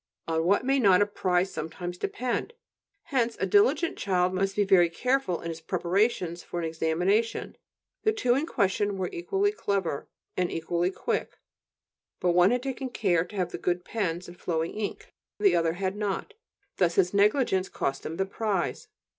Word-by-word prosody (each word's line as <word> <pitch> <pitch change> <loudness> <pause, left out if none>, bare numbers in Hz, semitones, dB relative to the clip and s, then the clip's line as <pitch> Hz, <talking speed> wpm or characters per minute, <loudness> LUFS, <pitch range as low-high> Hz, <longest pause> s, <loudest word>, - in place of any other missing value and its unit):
On 160 0 +1
what 200 +7 +3
may 270 +1 +3
not 200 -4 +6
a - - 0
prize 185 -2 0
sometimes 175 +3 -5
depend! 245 - -2 0.6
Hence 235 -3 +1
a - - +1
diligent 405 -5 +3
child 185 -2 +1
must 195 +1 0
be 210 - +3
very 185 -3 +5
careful 250 -1 0
in 170 - -5
his 165 0 -6
preparations 180 0 0
for - - -7
an 170 - -2
examination; 175 +8 0 0.5
the 435 - +3
two 330 - +2
in 280 +5 0
question 200 - 0
were 185 -1 -2
equally 390 - 0
clever 195 - -2 0.3
and 180 -1 0
equally 170 +2 0
quick; 190 - -3 0.8
but 180 - +2
one 175 +2 +5
had 245 +2 0
taken 265 -1 -3
care 185 -8 +1
to 195 - -12
have 180 -3 -1
good 180 0 -1
pens 180 -5 -2
and 175 0 -12
flowing 165 -1 -1
ink, 210 -1 -5 0.2
and - - -3
the 395 - +6
other 165 -1 +2
had 190 +2 -2
not. 210 - -3 0.4
Thus 170 -2 +2
his 185 -1 +3
negligence 200 -2 +3
cost 135 0 -2
him 160 - -5
the 190 - +1
prize. 195 -2 -2
190 Hz, 175 wpm, -27 LUFS, 175-225 Hz, 0.8 s, not